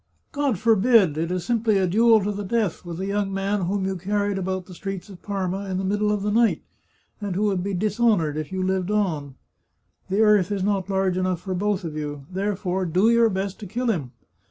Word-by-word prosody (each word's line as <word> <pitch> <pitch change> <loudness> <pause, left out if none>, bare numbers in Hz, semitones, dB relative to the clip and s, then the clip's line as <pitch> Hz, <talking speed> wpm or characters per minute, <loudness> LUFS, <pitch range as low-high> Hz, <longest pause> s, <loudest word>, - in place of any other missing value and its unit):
" - - -47
God 285 - 0
forbid! 220 -5 +4
It 165 +2 -2
is 180 -1 -2
simply 225 -3 +2
a 190 - +2
duel 220 +3 +4
to 205 - -1
the 205 0 -4
death, 205 -3 -1
with 170 -1 -7
a 190 - -2
young 200 0 -1
man 195 -1 -1
whom 195 0 -1
you 190 0 -1
carried 200 +2 -1
about 185 0 -3
the 185 - -12
streets 195 +2 -6
of 190 -3 -12
Parma 195 -1 -3
in 185 - -1
the 190 - -2
middle 210 +2 +1
of 205 -1 -1
the 210 - 0
night, 230 +1 +2 0.6
and 200 -3 -3
who 200 - 0
would 195 -4 +1
be 195 +1 -2
dishonoured 205 -5 +1
if 155 +1 -4
you 190 0 -2
lived 190 0 0
on. 160 -10 -1 0.7
The 195 +3 +2
earth 210 -4 +4
is 200 -2 -1
not 195 -1 0
large 190 -2 +1
enough 185 -2 -1
for 190 - -4
both 200 +1 -1
of 160 -3 -5
you. 145 -2 -5
Therefore 190 -1 -1
do 185 +7 +3
your 235 -1 +4
best 195 0 -3
to 210 - -7
kill 240 +5 0
him. 150 - -3
195 Hz, 225 wpm, -24 LUFS, 185-210 Hz, 0.7 s, forbid